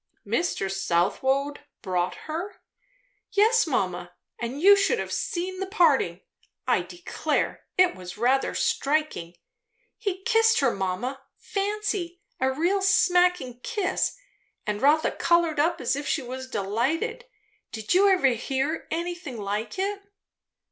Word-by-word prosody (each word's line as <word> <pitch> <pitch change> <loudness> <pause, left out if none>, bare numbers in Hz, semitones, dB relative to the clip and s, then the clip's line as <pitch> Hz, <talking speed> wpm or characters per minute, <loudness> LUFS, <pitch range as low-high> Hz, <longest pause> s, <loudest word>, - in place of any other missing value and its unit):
"Mr. 345 - 0
Southwode 265 +11 0 0.2
brought 180 -3 -1
her?" 335 +6 -5 0.7
"Yes, 440 +1 +4
mamma; 180 - -2 0.3
and 240 +4 -4
you 400 +5 +8
should 400 +4 +2
have - - -4
seen 370 +1 -3
the 385 - -3
parting. 290 - +2 0.4
I - - +2
declare, 350 0 -3
it 365 0 +5
was 185 +1 -9
rather 255 +4 +1
striking! 280 - 0 0.6
He 380 -3 -3
kissed 450 +1 +4
her, 270 -3 +3
mamma, 200 +8 -3 0.2
fancy! 395 -3 -2 0.2
a 260 0 +2
real 345 +8 +1
smacking 360 -8 +3
kiss; 400 - -1 0.5
and 210 -1 -2
Rotha 300 +3 +4
coloured 340 -3 +2
up 335 +3 +2
as 250 +2 0
if 285 +1 -4
she 280 - 0
was 260 +1 -7
delighted. 290 - -1 0.5
Did 220 -1 -2
you 395 +2 +5
ever 365 -8 +4
hear 270 +6 -2
anything 340 -5 -4
like 210 - -3
it?" 400 +1 -2
310 Hz, 125 wpm, -26 LUFS, 240-370 Hz, 0.7 s, you